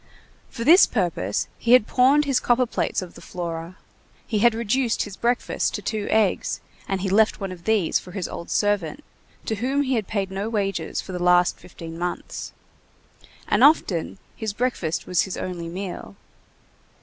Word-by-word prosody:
For 230 - -5
this 335 +9 +7
purpose 170 - -1
he 235 - +3
had 250 -4 +7
pawned 270 +6 +4
his 275 -3 +2
copperplates 240 -5 +1
of 180 - -11
the - - -13
Flora. 170 0 -6 0.5
He 215 - -1
had 235 +1 +4
reduced 235 +1 0
his 205 -2 -8
breakfast 240 +3 0
to - - -5
two 215 -2 -2
eggs, 215 -3 +1 0.3
and 195 -1 -1
he 195 - -1
left 215 +2 +3
one 195 -2 -4
of 175 -2 -10
these 215 -6 +2
for - - -13
his 190 -3 -3
old 170 - -7
servant, 205 - 0 0.4
to 220 - -2
whom 265 +6 0
he 265 -1 -1
had 220 -5 -1
paid 195 -3 -2
no 195 +3 -3
wages 195 -6 -2
for - - -9
the 180 -1 -4
last 180 0 +4
fifteen 165 -1 -10
months. 175 0 -4 1.0
And 210 - +3
often 200 - +3 0.2
his 220 -3 -4
breakfast 210 -9 -1
was 180 -2 +2
his 190 - -4
only 175 -2 -4
meal. 175 - -6
200 Hz, 175 wpm, -24 LUFS, 180-235 Hz, 1.0 s, this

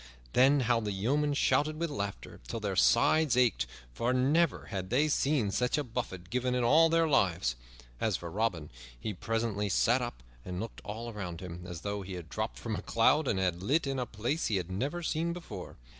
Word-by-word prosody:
Then 135 +3 +5
how 120 -1 +2
the 105 -2 -3
yeomen 140 +9 +1
shouted 155 +2 +2
with 170 -2 -1
laughter 100 -7 -5
till - - -4
their - - -2
sides 155 -6 +4
ached, 125 -5 +3 0.3
for 120 - 0
never 145 +5 +2
had 95 -3 -3
they 140 +6 +3
seen 140 -7 +1
such 125 +6 +1
a 150 - 0
buffet 115 -8 -5
given 125 0 0
in 125 - +1
all 160 +7 +6
their 165 0 +3
lives. 90 - +2 0.4
As 105 -5 +1
for 85 -1 -7
Robin, 95 -7 -1 0.3
he 105 - -3
presently 110 0 -1
sat - - +3
up - - -5 0.2
and 90 -1 -5
looked 115 +2 -6
all 115 +3 -5
around 90 -5 -5
him, 90 -1 -8
as 85 -3 -7
though 100 +1 -3
he 95 0 -7
had 85 -3 -7
dropped 110 +1 -3
from 110 -2 -3
a 90 - -4
cloud 135 +8 +3
and 100 - +1
had 90 -2 0
lit 145 - +1
in 135 -1 -2
a 125 - -2
place 120 +10 -1
he 110 - 0
had 90 -1 -2
never 140 - -2
seen 165 +1 0
before. 175 -1 -8
115 Hz, 205 wpm, -31 LUFS, 95-140 Hz, 0.4 s, all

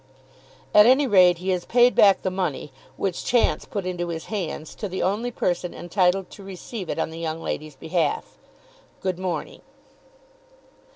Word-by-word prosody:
"At 210 +1 +8
any 265 +3 +5
rate 185 -7 +5
he 185 +2 -4
has 180 -2 0
paid 245 +1 +4
back 200 -2 +5
the 185 - -1
money, 180 -7 -3 0.3
which 190 -3 -2
chance 240 -1 +2
put 200 -4 -4
into 175 -1 -3
his 165 -1 -5
hands, 165 -6 -4
to 205 - -4
the 185 - -3
only 210 +6 0
person 180 -6 -2
entitled 180 +1 0
to 200 - -12
receive 195 +1 -7
it - - -2
on 160 - -1
the 165 - -8
young 160 -1 -3
lady's 155 -2 -5
behalf. 160 -3 -2 0.6
Good 185 -2 -2
morning." 180 -4 -4
185 Hz, 165 wpm, -24 LUFS, 170-200 Hz, 0.6 s, At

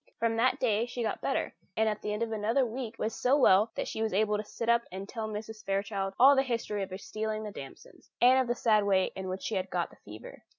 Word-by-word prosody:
From 230 0 0
that 255 +3 +2
day 225 -1 +1
she 240 0 -4
got 220 - -2
better, - - -1 0.2
and 220 0 +3
at 210 -1 -1
the 210 - -3
end 210 +2 -1
of 230 - -3
another 225 +5 +1
week 235 -1 -5
was 220 - -2
so 260 +3 +2
well 215 -5 +5
that - - -3
she 220 - -4
was 220 -2 0
able 210 +1 +2
to 210 - -2
sit 230 +2 -6
up 235 0 +4
and 190 +2 -6
tell 220 -1 -4
Mrs. 215 0 -7
Fairchild 195 -1 -2
all 275 +3 +8
the 270 - +4
history 230 -5 -2
of 195 - -3
her 185 - -6
stealing 215 +1 -4
the 210 - -5
damsons, 135 -8 -12
and 255 +2 +6
of 260 - +1
the 240 - 0
sad 215 -3 +3
way 190 -2 +2
in 190 -1 -5
which 185 +1 -5
she - - -3
had 190 -1 -1
got 175 -1 -2
the - - -18
fever. 105 +1 -12
215 Hz, 265 wpm, -30 LUFS, 200-235 Hz, 0.2 s, all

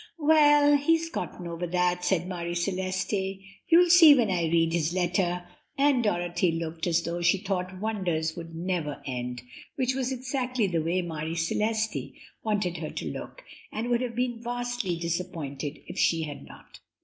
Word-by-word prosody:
"Well, 295 -2 +5
he's 330 +3 +1
gotten 180 - -5
over 170 +1 -4
that," 180 0 +1
said 180 -2 +1
Marie 175 -2 -4
Celeste; 190 +2 -1 0.3
"you'll 345 +1 +6
see 330 -4 +9
when 230 -7 +2
I 175 -2 +1
read 165 0 +2
his 170 -1 0
letter." 180 0 0 0.3
And 275 -3 +3
Dorothy 175 -3 +1
looked 165 +1 -3
as 170 -1 +2
though 170 +1 -3
she 175 +3 +4
thought 185 -2 -3
wonders 180 -7 -1
would 165 -1 -8
never 170 -4 -3
end, 125 -2 -4 0.3
which 260 0 0
was 260 0 -1
exactly 255 -2 -1
the 170 -4 0
way 175 +3 0
Marie 160 -1 -4
Celeste 215 +6 -1 0.3
wanted 205 -5 -1
her - - -4
to - - -5
look, - - -8 0.3
and 225 +3 -3
would 240 0 +2
have 245 -2 -3
been 240 -1 -1
vastly 245 -5 -2
disappointed 165 -4 -4
if - - -7
she 165 -1 +2
had 145 -2 -7
not. - - -15
185 Hz, 165 wpm, -27 LUFS, 170-245 Hz, 0.3 s, see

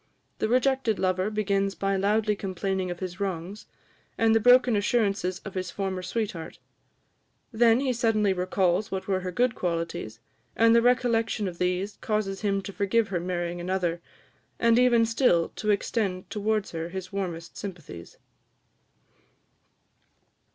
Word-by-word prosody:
The 220 - 0
rejected 255 -2 +2
lover 185 +1 0
begins 200 -2 0
by 195 +3 0
loudly 210 +2 +1
complaining 190 -1 -3
of 175 +1 -6
his 185 0 -5
wrongs, 195 +1 -4 0.5
and 225 0 +3
the 225 - +4
broken 245 0 +5
assurances 200 -4 0
of 195 - -7
his 185 -1 -3
former 190 -1 -3
sweetheart: 180 -3 -4 0.9
then 230 0 +4
he 265 -2 0
suddenly 220 -4 +2
recalls 185 +2 0
what 190 -1 -4
were 190 -2 +1
her 185 0 -4
good 245 +6 +1
qualities; 165 -11 -3 0.4
and 230 0 +5
the 235 - +6
recollection 230 -3 +1
of 175 -2 -7
these 180 +3 -1
causes 210 -3 -2
him 195 -2 0
to 200 - -7
forgive 205 +2 +1
her 180 -3 -1
marrying 175 0 -3
another, 175 -2 -1 0.6
and 230 +1 +4
even 240 -2 +4
still 225 -7 +2
to 215 - -5
extend 200 -2 0
towards 215 -1 -1
her 165 0 -4
his 190 +1 -7
warmest 175 -4 -4
sympathies. 165 - -9
195 Hz, 145 wpm, -26 LUFS, 180-225 Hz, 0.9 s, the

